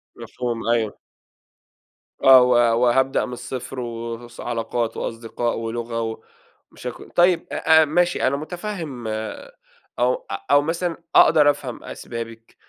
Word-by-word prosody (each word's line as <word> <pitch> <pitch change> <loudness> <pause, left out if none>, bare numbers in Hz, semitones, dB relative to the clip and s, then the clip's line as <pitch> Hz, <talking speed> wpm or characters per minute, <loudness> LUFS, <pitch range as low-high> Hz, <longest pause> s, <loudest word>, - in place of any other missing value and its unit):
مفهوم، 120 -2 -5
أيوه. 115 -3 0 1.3
آه، 130 -1 +9
و 125 - +2 0.3
وهابدأ 130 +2 +2
من 125 - -7
الصفر 125 +1 -6
و 115 -1 -4
وس 120 0 -15
علاقات 115 -1 -2
وأصدقاء 115 +1 -3
ولغة 115 -1 -4 0.5
ومشاك - - -7 0.2
طيب، 175 0 +3
أ 160 0 +5
أ - - +1
ماشي، 175 +2 +1
أنا 140 +2 +1
متفهم 160 - -6 0.9
أو - - +3 0.4
أو 145 - +6
مثلًا 165 +2 -2 0.2
أقدر 150 -2 +7
أفهم 140 -4 -3
أسبابِك 115 -1 -8
125 Hz, 120 wpm, -22 LUFS, 115-145 Hz, 1.3 s, آه